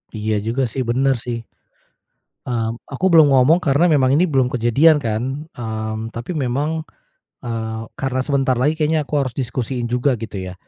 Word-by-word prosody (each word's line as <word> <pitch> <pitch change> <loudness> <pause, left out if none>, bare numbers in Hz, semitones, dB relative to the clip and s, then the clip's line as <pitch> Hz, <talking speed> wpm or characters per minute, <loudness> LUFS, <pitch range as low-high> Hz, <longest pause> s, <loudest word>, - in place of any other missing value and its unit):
Iya 110 0 -1
juga 120 +4 0
sih, 135 - -2
bener 135 +3 +2
sih. 120 -1 -3 1.1
Mmm, 115 -1 -2
aku 140 +7 -3
belum 160 -3 +7
ngomong 140 +7 +5
karena 160 +1 +2
memang 135 -3 +3
ini 165 - +4
belum 135 -8 +2
kejadian 125 +6 +4
kan, 125 +6 -2
mmm, 110 -1 -5
tapi 115 +7 -5
memang, 150 +2 -1 0.6
eee, 110 -1 -4 0.2
karena 130 -1 -1
sebentar 135 -3 +1
lagi 135 +5 +2
kayaknya 155 0 +1
aku 145 0 -1
harus 130 -3 -2
diskusiin 125 -1 -3
juga 125 +2 +1
gitu 110 -3 -6
ya. 90 -1 -6
130 Hz, 165 wpm, -20 LUFS, 115-145 Hz, 1.1 s, belum